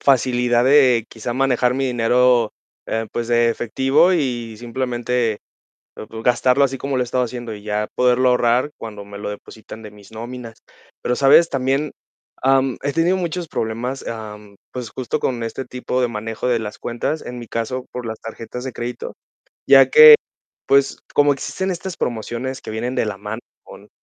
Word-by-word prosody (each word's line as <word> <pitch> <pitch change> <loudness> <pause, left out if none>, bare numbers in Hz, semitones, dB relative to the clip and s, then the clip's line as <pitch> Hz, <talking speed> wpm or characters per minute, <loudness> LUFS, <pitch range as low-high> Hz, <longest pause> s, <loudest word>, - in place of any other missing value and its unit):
facilidad 125 -2 +2
de 130 -4 +5
quizá 120 +1 -5
manejar 125 -1 +1
mi 135 0 0
dinero, 120 -1 +3 0.3
eh, 115 0 -2
pues 120 0 -3
de 120 0 +3
efectivo 135 +9 +2
y 120 -8 -2
simplemente 120 -1 -2 0.6
pues 110 +1 -9
gastarlo 125 +3 +3
así 135 -1 -2
como 140 -1 -2
lo 125 - +2
he - - -1
estado 125 +1 0
haciendo, 120 -1 -6
y 105 - -11
ya 105 0 -2
poderlo 125 0 +3
ahorrar 125 +3 +2
cuando 105 -3 -8
me 100 0 -10
lo 105 - -5
depositan 110 +2 -10
de 105 - -9
mis 105 0 -17
nóminas. 115 0 -8 0.4
Pero, 125 - 0
¿sabes?, 140 +5 +5
también, 135 +2 0 0.5
am, 135 -1 +2
he 140 +1 -1
tenido 165 +4 +2
muchos 175 -1 -3
problemas, 120 +4 -3
am, 105 -2 -8 0.2
pues 125 -3 -5
justo 130 -2 -3
con 120 -2 -1
este 115 +3 -4
tipo 125 0 -3
de 125 - +2
manejo 110 +1 -5
de 120 -2 +2
las 105 -1 -6
cuentas, 120 +6 -3
en 125 0 -6
mi 120 -2 -9
caso 125 +3 -3
por 125 -1 -5
las 110 -1 -6
tarjetas 115 +2 -8
de 130 - -5
crédito, 120 +1 -6 0.5
ya - - +7
que, 465 0 +10 0.5
pues, 140 0 +3 0.2
como 145 0 +5
existen 190 +7 -3
estas 180 +1 -6
promociones 120 +3 -3
que - - -8
vienen 120 +4 -3
de - - +1
la 105 - -4
mano 105 +3 -6 0.2
con - - -14
125 Hz, 175 wpm, -20 LUFS, 115-130 Hz, 0.6 s, que